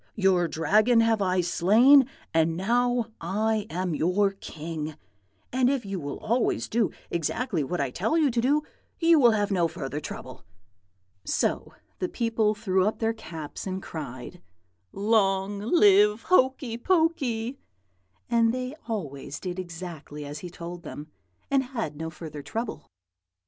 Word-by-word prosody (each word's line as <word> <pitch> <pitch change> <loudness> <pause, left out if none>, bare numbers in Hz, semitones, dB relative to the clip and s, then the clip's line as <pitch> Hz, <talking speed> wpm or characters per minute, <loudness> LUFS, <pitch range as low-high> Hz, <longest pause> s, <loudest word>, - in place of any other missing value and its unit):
Your 190 -4 +3
Dragon 215 +10 +3
have 225 -2 +2
I 185 -1 +2
slain, 230 +11 +5 0.3
and 160 0 +2
now 240 +3 +1
I 215 +4 0
am 180 0 -2
your 185 +6 +2
king; 160 -4 -6 0.6
and 255 0 +3
if 270 -5 -1
you 195 -1 -3
will 145 -2 -5
always 235 +2 0
do 230 -2 +1 0.2
exactly 170 - -1
what 175 +6 -3
I 140 -3 -1
tell 220 - 0
you 300 -5 +3
to 235 0 +1
do, 290 +5 +2 0.3
you 330 -1 +5
will 245 -4 +7
have 210 -2 +1
no 175 -3 +2
further 145 -2 -5
trouble.' - - -8 0.8
"So - - -1 0.2
the 180 - -1
people 225 -3 +1
threw 190 -2 +1
up 215 - -1
their 225 0 0
caps 165 -7 -8
and 190 0 -3
cried, 155 -1 -8 0.5
'Long 200 -1 +1
live 210 - +4
Hokey 260 -7 +2
Pokey!' 275 -8 +1 0.7
and 230 -1 +3
they 255 +2 -3
always 145 - -5
did 180 -1 -5
exactly 165 -4 -7
as 145 +1 -6
he 180 - -7
told 170 0 -8
them, 150 -1 -9 0.4
and 275 -1 +4
had 235 - -4
no 160 +2 -4
further 155 -2 -8
trouble. 225 - -5
200 Hz, 145 wpm, -26 LUFS, 170-235 Hz, 0.8 s, will